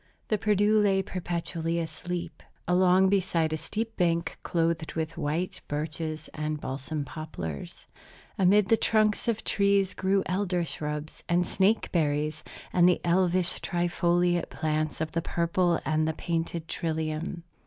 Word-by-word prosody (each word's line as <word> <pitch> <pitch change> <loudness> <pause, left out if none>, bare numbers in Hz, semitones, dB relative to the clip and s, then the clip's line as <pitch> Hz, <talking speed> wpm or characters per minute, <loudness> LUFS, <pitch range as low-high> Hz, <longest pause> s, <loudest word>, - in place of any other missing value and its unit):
The 215 - +1
Perdu 210 +1 +3
lay 195 -2 +3
perpetually 170 -2 -3
asleep, 170 +1 -4 0.3
along 185 +1 +5
beside 175 -5 +1
a - - 0
steep 220 +8 -4
bank 170 -2 0
clothed 165 -1 -1
with 160 0 -2
white 160 +5 -2
birches 155 +1 -3
and 155 0 -3
balsam 140 +2 -4
poplars. 125 - -7 0.5
Amid 195 +1 +4
the 225 - +5
trunks 215 -1 +2
of 230 - +3
the - - -12
trees 200 -2 +2
grew 190 +1 +1
elder 180 -2 0
shrubs, 150 0 -5
and 175 +1 +3
snake 200 +5 +1
berries, 155 -1 0 0.3
and 175 0 +6
the 180 - +2
elvish 180 0 +2
trifoliate 175 0 +1
plants 155 0 -2
of 160 0 -2
the 165 - -1
purple 170 +1 +1
and 155 0 +1
the 160 - 0
painted 165 0 -3
trillium. 160 +2 -3
170 Hz, 140 wpm, -28 LUFS, 155-185 Hz, 0.5 s, and